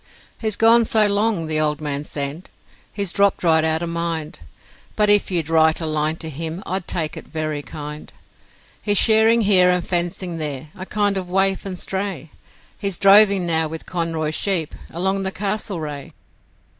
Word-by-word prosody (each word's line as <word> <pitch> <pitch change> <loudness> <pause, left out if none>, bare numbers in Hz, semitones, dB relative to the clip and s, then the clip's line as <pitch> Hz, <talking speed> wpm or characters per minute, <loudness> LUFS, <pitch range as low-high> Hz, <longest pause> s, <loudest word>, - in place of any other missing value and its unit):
'He's 220 -2 -2
gone 230 +2 +5
so 215 -1 +3
long,' 205 -3 +1
the 155 -1 -1
old 150 -1 0
man 145 -2 -3
said, 145 +5 -4 0.4
'he's 200 -4 -2
dropped 200 -1 +1
right 160 -2 +3
out 160 +1 +1
of 170 - -3
mind, 170 -2 -3 0.6
But 210 -1 +3
if 205 -1 +3
you'd 170 -5 -1
write 160 -1 +3
a 165 - -3
line 155 0 0
to 160 -1 -6
him 165 +5 -5
I'd 185 0 -4
take 160 -3 -1
it - - -9
very 155 -1 -4
kind; 150 +1 -8 0.7
He's 205 -1 +1
shearing 220 +2 +5
here 190 -4 +4
and 180 -1 0
fencing 175 -1 -2
there, 150 -1 -5
a 185 +1 -8
kind 205 -2 0
of 185 -2 -5
waif 195 +1 +1
and 185 -2 -5
stray, 190 -4 -5 0.5
He's 195 -4 -2
droving 200 -1 +5
now 160 -1 +1
with 160 +1 -8
Conroy's 165 -3 -2
sheep 175 -4 0 0.2
along 190 +3 -1
the 190 0 -2
Castlereagh. 190 -8 -4
175 Hz, 170 wpm, -21 LUFS, 160-200 Hz, 0.7 s, gone